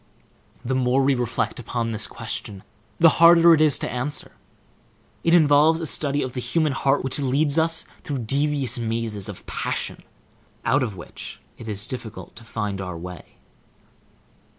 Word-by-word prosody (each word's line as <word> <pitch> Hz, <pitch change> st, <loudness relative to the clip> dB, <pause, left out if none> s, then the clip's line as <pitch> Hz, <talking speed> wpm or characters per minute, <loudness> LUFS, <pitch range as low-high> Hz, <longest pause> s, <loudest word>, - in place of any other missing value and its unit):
The 130 Hz, -, -1 dB
more 130 Hz, +1 st, +2 dB
we 140 Hz, +1 st, +3 dB
reflect 120 Hz, -1 st, -2 dB
upon 115 Hz, 0 st, -3 dB
this 110 Hz, -1 st, -2 dB
question, 100 Hz, -3 st, -6 dB, 0.4 s
the 165 Hz, -2 st, +5 dB
harder 170 Hz, 0 st, +8 dB
it 155 Hz, -, +3 dB
is 155 Hz, -3 st, +4 dB
to -, -, -4 dB
answer. 130 Hz, +3 st, -3 dB, 0.9 s
It 165 Hz, +1 st, +4 dB
involves 155 Hz, 0 st, +5 dB
a 165 Hz, -, -3 dB
study 145 Hz, -1 st, 0 dB
of 130 Hz, -2 st, -5 dB
the 130 Hz, -, -4 dB
human 155 Hz, +2 st, +1 dB
heart 135 Hz, 0 st, +1 dB
which 135 Hz, +2 st, +2 dB
leads 140 Hz, +3 st, +2 dB
us 165 Hz, 0 st, +1 dB, 0.2 s
through 135 Hz, -5 st, -4 dB
devious 140 Hz, -1 st, +1 dB
mazes 115 Hz, -3 st, -2 dB
of -, -, -10 dB
passion, -, -, -3 dB, 0.6 s
out 130 Hz, +5 st, +3 dB
of 115 Hz, -6 st, -2 dB
which 85 Hz, -, -9 dB, 0.2 s
it 115 Hz, -, -9 dB
is 105 Hz, -1 st, -1 dB
difficult 120 Hz, -4 st, -8 dB
to 115 Hz, -, -10 dB
find 105 Hz, -3 st, -4 dB
our 90 Hz, -2 st, -5 dB
way. 90 Hz, -1 st, -10 dB
130 Hz, 160 wpm, -23 LUFS, 115-150 Hz, 0.9 s, harder